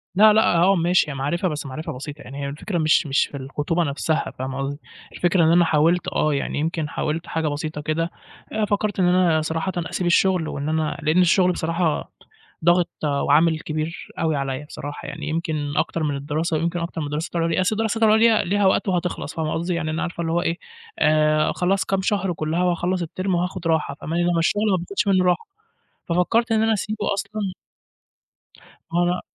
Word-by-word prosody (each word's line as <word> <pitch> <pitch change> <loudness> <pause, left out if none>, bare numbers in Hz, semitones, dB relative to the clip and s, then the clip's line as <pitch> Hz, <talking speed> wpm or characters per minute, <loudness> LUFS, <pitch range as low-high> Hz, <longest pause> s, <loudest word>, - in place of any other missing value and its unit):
لأ، 215 +2 +7
لأ، 215 -5 +4
آه 185 +4 +4
ماشي، 175 -2 +2
هي - - -4
معرفة 145 +7 -1
بس 150 -4 -4
معرفة 140 +4 -5
بسيطة 145 +2 -8
يعني، 135 +3 -9
هي - - -3
الفكرة 175 +6 -4
مش 160 0 +3
مش 140 -1 +2
في 140 - -8
الخطوبة 145 +5 -1
نفسها، 155 +1 -1
فاهمة 130 0 -4
قصدي، 140 +1 -3 0.3
الفكرة 175 0 +2
إن 160 - +4
أنا 175 0 +5
حاولت 165 +3 +2
آه، 155 - +1
يعني 140 +1 -2
يمكن 160 0 -2
حاولت 155 +3 -3
حاجة 160 -1 -1
بسيطة 150 +1 -3
كده، 160 +3 -1 0.4
آآ، 215 -1 +1
فكرت 205 -1 -1
إن 185 - +4
أنا 180 -3 +3
صراحةً 160 +4 -2
أسيب 175 +1 -2
الشغل 180 -1 +3
وإن 145 +1 -3
أنا 155 -1 -1
لأن 155 +4 +3
الشغل 180 +1 +4
بصراحة، 165 -1 -1 0.5
ضاغط 175 0 +4
وعامل 150 +2 +3
كبير 155 +1 -4
أوي 160 -2 +1
عليّا، 135 +1 -3
بصراحة 145 0 -7
يعني - - -6
يمكن 155 -3 -2
أكتر 165 - 0
من 145 -2 0
الدراسة، 155 +3 -1
ويمكن 170 +2 -1
أكتر 170 -1 -4
من 150 - -3
الدراسات 150 +4 -4
العُليا، 165 +1 +1
أصل 185 +4 +1
الدراسة 225 +1 +1
العُليا 220 0 +5
ليها 200 +2 +1
وقت 190 - +2
وهتخلص، 180 -5 -2
فاهمة 155 -1 -2
قصدي، 170 +2 -1
يعني 160 -2 -2
أنا 160 - -2
عارفة 170 0 -3
اللي 165 -1 -2
هو 175 - +2
إيه، 170 0 -1 0.4
آآ، 155 0 +3
خلاص 190 +2 +1
كام 195 -1 0
شهر 195 -2 0
كلّها 160 +2 -1
وأخلّص 180 +1 0
التيرم 185 +3 -2
وهاخد 180 0 -2
راحة 160 -3 +1
فاهماني، 165 +2 -1
إنما 175 -1 +2
الشغل 205 +5 +1
ما 190 - +3
بناخدش 190 +4 -2
منّه 185 -2 +3
راحة، 180 - +1 0.6
ففكرت 220 +7 +2
إن 220 -1 +3
أنا 225 0 +3
أسيبه 215 0 -1
أصلًا 200 0 -3 1.4
ما 170 - +2
هو - - +4
أنا 180 +1 0
170 Hz, 195 wpm, -22 LUFS, 155-185 Hz, 1.4 s, لأ